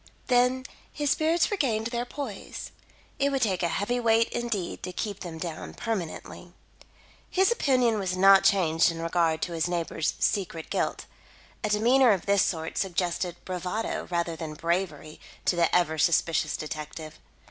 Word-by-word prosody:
Then 250 +1 +3 0.3
his 290 -1 -1
spirits 325 +4 +2
regained 245 - 0
their 240 0 -2
poise. 245 -6 -7 0.5
It 280 0 +3
would 270 -2 +1
take 190 -5 0
a 175 - +2
heavy 205 +8 -1
weight 230 -1 +3
indeed 225 -7 -3
to 185 - -5
keep 200 +2 -4
them 170 -3 -7
down 165 -1 -6
permanently. 205 -8 -5 0.8
His 380 +4 +3
opinion 250 - +2
was 185 -2 -2
not 195 +1 +7
changed 170 -4 +4
in 165 -1 -5
regard 165 -1 +1
to 175 - -3
his 165 0 0
neighbour's 165 -2 -1
secret 170 -5 -1
guilt. - - -1 0.6
A 215 - 0
demeanour 235 +3 +5
of 190 - -3
this 200 -1 +3
sort 160 -2 -1
suggested 175 -1 -1
bravado 185 +4 -3
rather 170 -1 -1
than 160 -2 -6
bravery 165 -2 -2 0.3
to - - +2
the 170 -1 +2
ever 160 -3 +2
suspicious 165 +2 +2
detective. 155 0 -7
185 Hz, 155 wpm, -27 LUFS, 165-230 Hz, 0.8 s, not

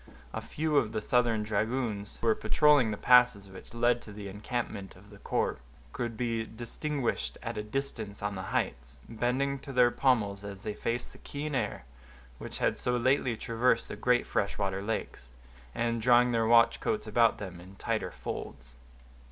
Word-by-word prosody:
A - - -3
few 155 -1 -1
of 110 -5 +2
the - - 0
Southern 115 -1 +2
dragoons, 110 0 -2
who - - -5
were 110 - +5
patrolling 145 -1 +4
the 105 - -3
passes 125 -5 +5
which 95 +4 -12
led 120 0 +2
to 105 - -11
the 100 -1 -7
encampment 105 -1 -4
of 100 +3 -17
the 100 - -13
corps, - - -1 0.3
could 120 -3 -3
be 115 -1 -1
distinguished 120 +4 -3
at - - -4
a 105 - -2
distance 110 -3 -4
on 105 0 -1
the 95 - -5
heights, 65 +2 -2
bending 130 +4 -1
to 140 +1 -9
their 125 -2 +5
pommels 105 -8 +1
as 100 -1 -8
they 105 - -3
faced 115 +3 -3
the - - -16
keen 145 +1 -5
air 130 - -2 0.5
which - - -6
had - - 0
so 125 0 +1
lately 130 -1 +2
traversed 115 +1 +1
the - - -5
great 120 +3 +2
fresh 100 - -1
water 95 -1 -1
lakes, 100 - -4 0.5
and 115 -1 0
drawing 120 +1 +5
their 115 -1 +2
watch 115 0 +5
coats 215 -1 -1
about 115 -1 +3
them 90 -4 -7
in 95 +2 -13
tighter - - -2
folds. - - -7
115 Hz, 180 wpm, -30 LUFS, 105-125 Hz, 0.5 s, were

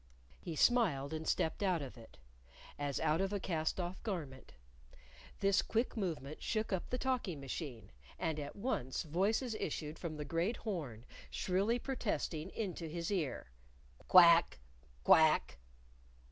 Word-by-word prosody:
He 165 - -6
smiled, 160 - +3
and 160 0 -4
stepped 160 - 0
out 180 -6 +1
of 135 - -8
it, 115 - -14 0.6
as 145 -1 -1
out 160 +2 +2
of 195 0 0
a 205 - -1
cast 160 -2 -1
off 180 +1 -4
garment. 155 - -5 0.9
This 195 -1 +4
quick 230 +3 -1
movement 160 - -3
shook 215 -2 -1
up 185 - -2
the 250 - -1
talking 250 - -1
machine, 130 - -6 0.3
and 160 -3 -1
at 145 -1 -6
once 200 - -2
voices 200 - 0
issued 155 -5 -4
from 160 -3 -5
the 150 - -4
great 170 +10 0
horn 145 - -5 0.2
shrilly 195 +6 +1
protesting 205 - -2
into 185 -6 -4
his 170 +3 -3
ear 155 - -2 0.6
"Quack! 170 -2 +7 0.5
Quack! 155 - +5
170 Hz, 140 wpm, -35 LUFS, 150-200 Hz, 0.9 s, Quack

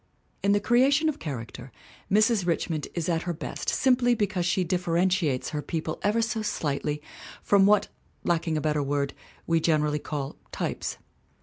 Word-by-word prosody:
In 200 - +2
the 205 - +4
creation 270 +8 +3
of 305 - -4
character 130 -3 -6 0.4
Mrs. 215 -2 +3
Richmond 165 -3 -1
is 170 -2 -2
at 165 -2 +1
her 175 0 -2
best 155 - -4
simply 245 -2 +3
because 195 -5 0
she 185 +1 +2
differentiates 175 -4 +1
her 150 - -3
people 160 0 -3
ever 215 +3 +2
so 225 -1 -1
slightly 150 -7 -2 0.4
from 200 -1 +5
what, 210 -1 +4 0.4
lacking 165 -2 0
a - - -1
better 150 -1 +1
word, 140 0 -1 0.3
we 165 0 +2
generally 150 -2 +1
call 145 -2 -5
types. - - -3
170 Hz, 155 wpm, -27 LUFS, 150-205 Hz, 0.4 s, from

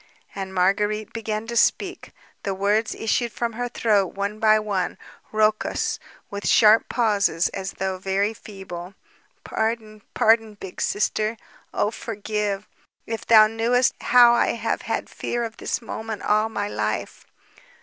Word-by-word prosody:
And 190 -1 -5
Marguérite 205 +3 0
began 220 -1 -3
to 235 +1 -5
speak. - - +1 0.3
The 195 -1 -3
words 205 +3 +1
issued 235 +1 0
from 235 +1 -3
her 245 +2 -3
throat 205 -6 +1
one 200 +2 -3
by 215 0 +5
one, 205 -4 -2 0.3
raucous, 215 0 +1 0.3
with 200 0 -4
sharp 220 +1 +5
pauses, 205 -7 +2
as 190 0 -5
though 190 -1 -3
very 195 +3 0
feeble. 190 -4 -9 0.5
"Pardon, 220 -1 -3
pardon, 225 -1 +3
Big 190 -2 -8
Sister; 215 +2 0 0.3
oh, 210 - 0
forgive! 210 -2 -3 0.4
If 225 -2 -5
thou 220 -2 +8
knewest 230 +3 +2
how 240 -1 +6
I 240 - +2
have - - -2
had - - -3
fear 240 0 -3
of 225 -1 -6
this - - -3
moment 220 -1 -6
all 215 +1 +2
my 205 -2 -3
life...." - - -3
215 Hz, 140 wpm, -23 LUFS, 200-225 Hz, 0.5 s, thou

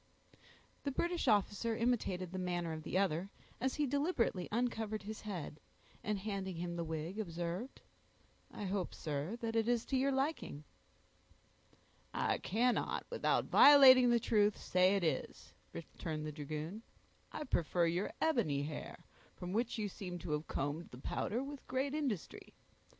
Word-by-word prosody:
The 285 - -2
British 340 +5 -1
officer 210 +2 +2
imitated 200 -7 0
the 185 - -4
manner 175 -2 -2
of 155 - -5
the 165 - -2
other, 190 -1 +1 0.3
as 260 +2 0
he 300 - +1
deliberately 280 - 0
uncovered 220 -2 -1
his 215 +1 -6
head, 180 -8 -6 0.4
and 210 0 0
handing 195 -2 -3
him 170 +1 -4
the 170 - -2
wig, 160 +5 -4
observed, 175 +5 -4 0.7
"I - - -7
hope, 190 -2 -2
sir, 155 +8 -3
it 225 0 -2
is 230 +1 +2
to 270 - -2
your 275 +2 +2
liking." 270 - -2 1.5
"I - - +1
cannot, 240 +5 0
without - - +1
violating 260 -3 +9
the 240 0 +4
truth, 210 -2 +3
say 185 +2 +3
it 195 - 0
is," 160 - -2 0.2
returned 155 -1 -5
the 155 - -3
dragoon. 155 +7 -5 0.5
"I - - -4
prefer 175 - +1
your 175 +4 0
ebony 155 - +1
hair, 150 +1 -7 0.3
from 180 +1 -6
which 235 +2 0
you 210 -2 -1
seem 185 -3 -6
to 155 - -5
have 150 +1 -1
combed 145 +5 -3
the 125 - -11
powder 225 - -2
with 280 0 -8
great 265 +2 -1
industry. 270 - -3
200 Hz, 150 wpm, -35 LUFS, 170-240 Hz, 1.5 s, violating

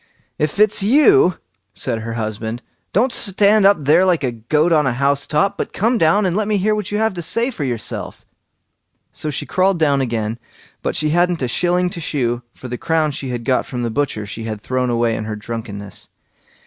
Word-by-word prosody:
"If 150 +3 -1
it's 210 0 +4
you", 280 - +5 0.4
said 115 -4 -2
her 115 +1 -5
husband, 110 +1 -4 0.3
"don't 240 +5 +2
stand 200 0 +4
up 200 - +4
there 155 +6 +4
like 180 -5 +2
a 125 - 0
goat 150 +9 0
on 150 -4 +3
a 130 - +1
house 140 +2 0
top, 195 +7 0
but - - -3
come 230 +3 +1
down 195 +6 +3
and 180 -2 0
let 210 0 0
me 210 -1 +1
hear 210 +3 +1
what 210 -2 -3
you 210 - 0
have 220 -1 +1
to 175 - -5
say 230 +10 +1
for 165 - -5
yourself." 120 -5 -4 0.9
So 155 - -4
she 145 - -3
crawled 185 0 +1
down 145 -4 +2
again, 115 -2 -2 0.4
but - - -2
she 155 -1 +1
hadn't 175 -2 +1
a - - 0
shilling 180 +7 +1
to 180 - -6
shew, 120 -6 -1
for 130 - -9
the 125 0 -5
crown 160 -2 +1
she 135 -1 -5
had 120 -2 -4
got 130 -2 +1
from 125 -2 -4
the 115 - -2
butcher 125 -5 -2
she 110 +2 -7
had 110 -2 -4
thrown 125 +1 -1
away 115 -1 +1
in 110 - -4
her 110 0 -4
drunkenness. 105 -2 -6
150 Hz, 210 wpm, -19 LUFS, 120-190 Hz, 0.9 s, you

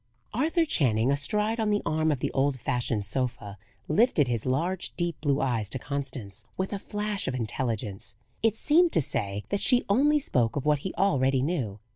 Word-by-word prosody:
Arthur 325 - +2
Channing 125 - +2
astride 210 +11 0
on 220 -1 +1
the 205 0 +1
arm 155 0 +1
of 135 -4 -2
the - - -1
old 135 -1 +1
fashioned 120 -3 -1
sofa 115 -3 -3 0.3
lifted 155 - +3
his 120 -1 -2
large 170 +8 -1
deep 175 -3 -2
blue 145 -2 +1
eyes 115 -6 -1
to 130 - -3
Constance 130 -7 -6
with 190 +2 -2
a 200 - -3
flash 205 0 -3
of 130 - -1
intelligence: 110 -4 -3 0.3
it 225 -1 +2
seemed 330 +8 +3
to - - +5
say, 100 -6 -2
that 200 - 0
she 250 +2 +3
only 285 +9 +4
spoke 125 - 0
of 145 - -2
what 150 -1 +3
he 185 +6 -4
already 135 -9 +2
knew. 135 - -2
140 Hz, 185 wpm, -27 LUFS, 120-200 Hz, 0.3 s, to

